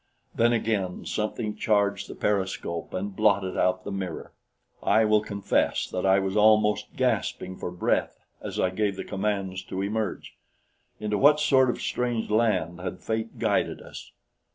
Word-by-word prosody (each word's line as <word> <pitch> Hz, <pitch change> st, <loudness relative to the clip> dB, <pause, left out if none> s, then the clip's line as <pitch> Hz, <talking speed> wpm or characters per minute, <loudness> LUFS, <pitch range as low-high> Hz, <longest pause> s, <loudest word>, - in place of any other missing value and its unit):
Then 120 Hz, +1 st, +3 dB
again 110 Hz, -6 st, -1 dB
something 105 Hz, 0 st, -2 dB
charged 100 Hz, -2 st, +1 dB
the -, -, -8 dB
periscope 95 Hz, -4 st, -2 dB
and 95 Hz, +1 st, -4 dB
blotted 100 Hz, -3 st, +2 dB
out 90 Hz, 0 st, +1 dB
the 100 Hz, -, -5 dB
mirror. 95 Hz, -4 st, -5 dB, 0.5 s
I 110 Hz, 0 st, +3 dB
will 105 Hz, 0 st, +4 dB
confess 100 Hz, -2 st, 0 dB
that 90 Hz, +1 st, -2 dB
I 95 Hz, 0 st, +5 dB
was 95 Hz, 0 st, -1 dB
almost 105 Hz, 0 st, +3 dB
gasping 95 Hz, 0 st, -1 dB
for -, -, -5 dB
breath 90 Hz, 0 st, 0 dB, 0.2 s
as -, -, -5 dB
I 90 Hz, -, +2 dB
gave 100 Hz, 0 st, 0 dB
the -, -, -5 dB
commands 95 Hz, -2 st, -2 dB
to 95 Hz, +1 st, -3 dB
emerge. 105 Hz, 0 st, -3 dB, 0.7 s
Into 105 Hz, -1 st, -1 dB
what 150 Hz, +2 st, +6 dB
sort 135 Hz, -4 st, +4 dB
of -, -, -2 dB
strange 120 Hz, -3 st, -2 dB
land 95 Hz, -7 st, +1 dB
had 90 Hz, 0 st, -5 dB
fate 110 Hz, 0 st, -3 dB
guided -, -, 0 dB
us? -, -, -11 dB
100 Hz, 155 wpm, -26 LUFS, 95-110 Hz, 0.7 s, what